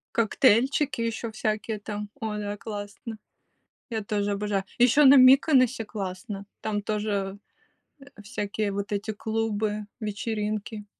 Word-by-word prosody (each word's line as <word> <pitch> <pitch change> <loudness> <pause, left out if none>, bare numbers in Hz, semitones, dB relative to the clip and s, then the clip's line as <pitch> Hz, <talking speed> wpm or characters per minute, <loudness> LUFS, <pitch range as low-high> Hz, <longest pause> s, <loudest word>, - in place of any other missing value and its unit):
Коктейльчики 260 +4 +3
еще 230 0 -2
всякие 215 0 -2
там. 210 0 -5
Ой, 215 -1 -3
да, 205 0 -4
классно. 210 +2 -7 0.7
Я 220 -3 -3
тоже 205 0 -1
обожаю. 200 -1 -1
Еще 250 +4 +5
на 270 +1 +9
Миконосе 255 -3 +6
классно. 195 0 -6 0.2
Там 205 -1 -2
тоже, 205 -2 -2 0.6
э, 275 - -15 0.2
всякие 205 -1 -3
вот 200 +1 -4
эти 205 +2 -2
клубы, 215 -1 -2
вечеринки. 210 0 -3
215 Hz, 120 wpm, -26 LUFS, 205-230 Hz, 0.7 s, на